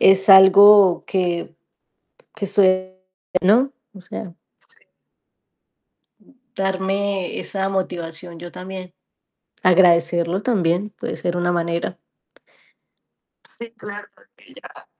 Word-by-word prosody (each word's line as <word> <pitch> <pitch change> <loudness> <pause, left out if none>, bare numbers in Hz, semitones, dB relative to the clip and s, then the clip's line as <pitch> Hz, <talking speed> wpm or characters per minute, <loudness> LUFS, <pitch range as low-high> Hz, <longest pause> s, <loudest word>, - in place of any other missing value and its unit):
Es 195 +1 +4
algo 195 0 +7
que 175 -2 -3 0.8
que 210 -2 -5
suele, 185 -1 +1 0.4
¿no? 240 +9 +3 0.2
O 195 - -13
sea 180 0 -9 2.2
darme 195 0 -2
esa 195 -1 -4
motivación 175 -3 -5
yo 175 +1 -10
también. 185 -1 -10 0.7
Agradecerlo 175 -1 +3
también 195 -4 -1
puede - - -7
ser 175 0 -3
una 175 0 -1
manera. 170 0 -3 1.5
Sí, 235 0 -10
claro 205 -2 -10 0.3
que - - -21
ya. - - -15
185 Hz, 90 wpm, -20 LUFS, 175-200 Hz, 2.2 s, algo